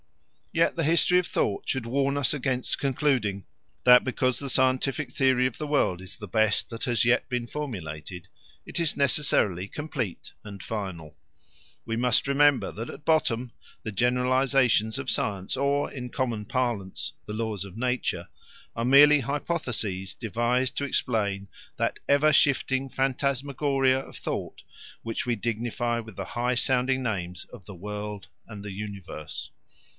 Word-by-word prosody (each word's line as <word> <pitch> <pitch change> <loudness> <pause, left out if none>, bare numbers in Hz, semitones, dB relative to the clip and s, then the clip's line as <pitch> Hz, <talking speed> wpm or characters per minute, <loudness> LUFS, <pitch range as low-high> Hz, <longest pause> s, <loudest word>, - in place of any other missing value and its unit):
Yet 165 0 +2
the 165 - 0
history 170 +3 +4
of 180 - -2
thought 100 - -1
should 130 -3 -1
warn 140 +3 0
us 140 -1 +2
against 130 -3 -1
concluding 125 - 0 0.4
that 125 0 +8
because 130 -1 0
the 140 - -4
scientific 130 +2 +1
theory 130 -2 +3
of 130 -3 -2
the 150 - -3
world 115 -11 +1
is 95 - -8
the 105 - -8
best 110 +3 +2
that 115 - -5
has 120 -2 +2
yet 120 +1 +2
been 125 -1 -1
formulated, 90 - -6 0.4
it - - -3
is 165 -3 +1
necessarily 120 - +2
complete 130 - -5
and 100 -2 -9
final. 95 -8 -5 0.7
We 115 - -2
must 125 +2 +2
remember 140 0 +3
that 115 +3 -6
at 150 - -10
bottom 125 -7 +1 0.3
the 110 - -4
generalisations 125 0 +2
of 135 -2 -4
science 95 -2 -1
or, 140 +2 +1
in 125 -2 -6
common 120 -5 -2
parlance, 115 -6 -2
the 105 - -5
laws 110 -3 -2
of 100 +1 -10
nature 125 0 -1 0.5
are 115 - -2
merely 145 +3 +7
hypotheses 120 - -2
devised 120 +3 0
to - - 0
explain 105 -7 0 0.3
that - - -1
ever 150 +2 +5
shifting 135 -1 +2
phantasmagoria 135 0 +1
of - - -10
thought - - -5 0.4
which 115 0 -3
we 120 - +2
dignify 120 +2 -1
with 110 -3 -9
the 95 - -4
high 125 +1 +1
sounding 130 +1 +2
names 90 -6 -3
of - - -11
the 100 - -9
world 105 +2 -6 0.2
and 105 -2 -9
the 105 - -5
universe. 100 -6 -7
125 Hz, 150 wpm, -27 LUFS, 105-135 Hz, 0.7 s, that